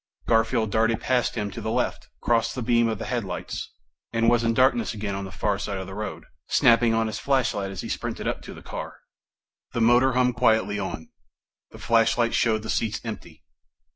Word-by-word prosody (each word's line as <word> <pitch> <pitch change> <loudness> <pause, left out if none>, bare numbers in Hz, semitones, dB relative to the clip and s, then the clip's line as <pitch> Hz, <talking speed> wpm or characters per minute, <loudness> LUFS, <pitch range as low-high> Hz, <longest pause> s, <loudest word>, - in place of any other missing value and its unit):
Garfield 115 -1 +2
darted 110 +1 +2
past 125 -1 0
him 105 -3 -2
to - - -7
the - - -3
left, - - -2
crossed 115 -1 +1
the 125 - -3
beam 115 0 +3
of 110 -1 -1
the - - -6
headlights, 120 -7 -4 0.4
and 115 0 +3
was 120 -1 +3
in 115 - +2
darkness 130 - +2
again 100 -1 -3
on 100 0 -4
the 95 - -8
far 100 +1 -1
side 100 -1 -3
of 95 - -5
the 95 - -9
road, 105 +2 -5 0.2
snapping 120 -3 +4
on 115 0 +2
his 110 - -4
flashlight 125 -8 0
as 95 -2 -6
he - - -6
sprinted - - -4
up - - -2
to - - -10
the - - -12
car. - - -6 0.8
The 115 - -1
motor 120 +3 +5
hummed 125 -1 +2
quietly 105 -3 +2
on. 80 - -5 0.6
The - - -13
flashlight 115 +1 +2
showed 110 -2 +2
the 110 - -7
seats 110 -2 -1
empty. 95 -9 -8
115 Hz, 200 wpm, -25 LUFS, 105-120 Hz, 0.8 s, motor